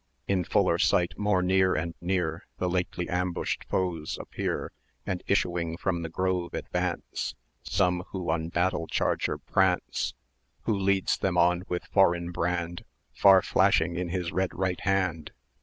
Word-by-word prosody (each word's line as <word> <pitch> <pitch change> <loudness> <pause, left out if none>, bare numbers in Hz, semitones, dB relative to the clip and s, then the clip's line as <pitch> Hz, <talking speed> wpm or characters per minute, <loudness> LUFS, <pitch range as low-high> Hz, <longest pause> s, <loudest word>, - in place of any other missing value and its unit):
In 95 -2 +1
fuller - - +2
sight, 85 -1 +2
more 105 -3 +1
near 95 0 +3
and 85 +1 -2
near, 85 -2 -1
The 90 - -1
lately 90 -1 -1
ambushed 90 0 -2
foes 85 -4 -2
appear, - - -3 0.3
And, 90 -2 -2
issuing 85 -4 0
from 85 -2 -1
the 80 - -4
grove, 90 0 -1
advance 70 - -3 0.3
Some 90 0 +1
who 90 -4 -3
on 80 0 -1
battle 85 -1 0
charger - - 0
prance. 95 -2 0 0.5
Who 110 - +1
leads 100 -1 +1
them 95 -2 0
on 90 +1 +3
with 90 - -2
foreign 85 -3 +2
brand 85 0 -2 0.3
Far 95 -1 +6
flashing 85 +2 +3
in 90 -1 -2
his 90 -1 -2
red 95 0 0
right 95 -1 -1
hand? 95 -6 0
90 Hz, 145 wpm, -28 LUFS, 85-95 Hz, 0.5 s, Far